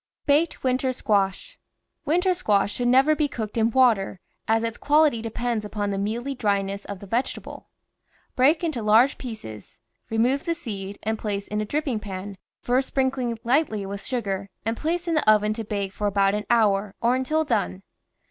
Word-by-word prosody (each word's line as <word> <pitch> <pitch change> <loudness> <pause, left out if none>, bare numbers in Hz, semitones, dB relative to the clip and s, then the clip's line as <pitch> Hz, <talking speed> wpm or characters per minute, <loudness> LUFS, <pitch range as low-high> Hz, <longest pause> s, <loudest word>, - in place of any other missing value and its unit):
BAKED 300 +4 +2
WINTER 260 0 +1
SQUASH 205 - -1 0.5
Winter 360 +4 +2
squash 205 - +1
should 245 - -1
never 265 +5 +5
be 300 -1 +1
cooked 220 -6 -5
in 225 -1 +3
water, 225 -7 +3 0.3
as 225 +1 +2
its 230 0 -3
quality 295 -5 +3
depends 230 0 -2
upon 205 -1 -3
the 195 - -2
mealy 235 +7 -2
dryness 200 -4 -1
of 200 -2 -7
the - - -8
vegetable. 235 +6 -3 0.7
Break 295 +6 +4
into 310 -8 -1
large 220 +6 +4
pieces, 210 - -9 0.3
remove 245 +5 +1
the 335 - 0
seed, 200 - -6
and 220 +1 -1
place 200 -2 -3
in 210 0 -2
a - - -2
dripping 275 -1 -1
pan, 195 -1 -7 0.2
first 255 +2 +1
sprinkling 260 -2 0
THE 230 - -2
VEGETABLE 230 +1 -15
GARDEN 285 +4 +6
lightly 200 -2 -4
with 200 0 -6
sugar, 200 -6 -3 0.2
and 225 +1 0
place 340 +6 -2
in 335 - +1
the 305 -8 +2
oven 210 0 +3
to 225 +1 -5
bake 200 -2 -3
for 210 - -2
about 195 -1 +2
an 210 -1 -3
hour, 205 -3 +2
or 235 +2 +2
until 305 +5 0
done. 205 -8 -1
225 Hz, 185 wpm, -24 LUFS, 205-265 Hz, 0.7 s, GARDEN